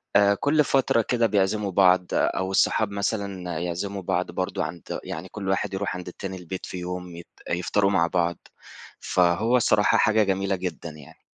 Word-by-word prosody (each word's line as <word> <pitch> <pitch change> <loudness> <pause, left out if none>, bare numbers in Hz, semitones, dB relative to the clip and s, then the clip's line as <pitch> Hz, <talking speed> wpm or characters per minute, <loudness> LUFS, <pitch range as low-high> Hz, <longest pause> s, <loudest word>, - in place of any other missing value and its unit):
آآ، 100 0 +6
كل 150 +6 +2
فترة 130 -4 +2
كده، 115 0 +1
بيعزِّموا 100 0 0
بعض، 90 -1 +4
أو 95 0 0
الصحاب 100 +2 +2
مثلًا 100 -4 -3
يعزِّموا 95 +3 -3
بعض 90 0 -1
برضه 95 - -2
عند 85 - -6
يعني، 85 +4 -6
كل 100 -2 -7
واحد 95 +1 -1
يروح 95 -1 -2
عند 90 0 -7
التاني 95 +1 -6
البيت، 90 +1 -7
في 90 - -7
يوم 90 -1 -6
يت 85 - -10 0.2
يفطروا 100 +3 +1
مع 85 -3 +3
بعض. 85 -1 0 0.6
فهو 90 +8 +2
الصراحة، 105 -3 +3
حاجة 110 0 +4
جميلة 95 0 0
جدًا 90 -2 -5
يعني. 75 -3 -14
95 Hz, 170 wpm, -25 LUFS, 90-100 Hz, 0.6 s, آآ